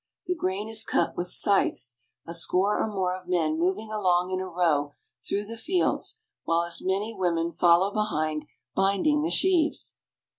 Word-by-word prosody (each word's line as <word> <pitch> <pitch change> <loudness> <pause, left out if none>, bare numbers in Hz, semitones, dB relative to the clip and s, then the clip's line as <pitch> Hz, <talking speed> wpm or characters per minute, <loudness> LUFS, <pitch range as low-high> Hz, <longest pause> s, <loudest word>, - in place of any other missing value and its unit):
The 360 - 0
grain 205 - -2
is 220 0 0
cut - - 0
with 175 - -3
scythes, 150 - +1 0.3
a 170 - -6
score 185 +4 +1
or - - +1
more 190 -3 -1
of 185 -1 -11
men 160 -3 +1
moving 195 +5 -1
along 185 -3 +1
in 185 - -1
a 185 - -4
row 160 -5 +1 0.3
through 205 +1 -2
the 230 +2 -7
fields, 360 - 0 0.3
while 165 +1 +2
as 170 0 0
many 195 +4 -1
women 170 -4 0
follow 175 +4 +4
behind, 155 -8 -1 0.3
binding 200 +11 +2
the 320 - 0
sheaves. 350 -5 +1
185 Hz, 170 wpm, -27 LUFS, 170-215 Hz, 0.3 s, follow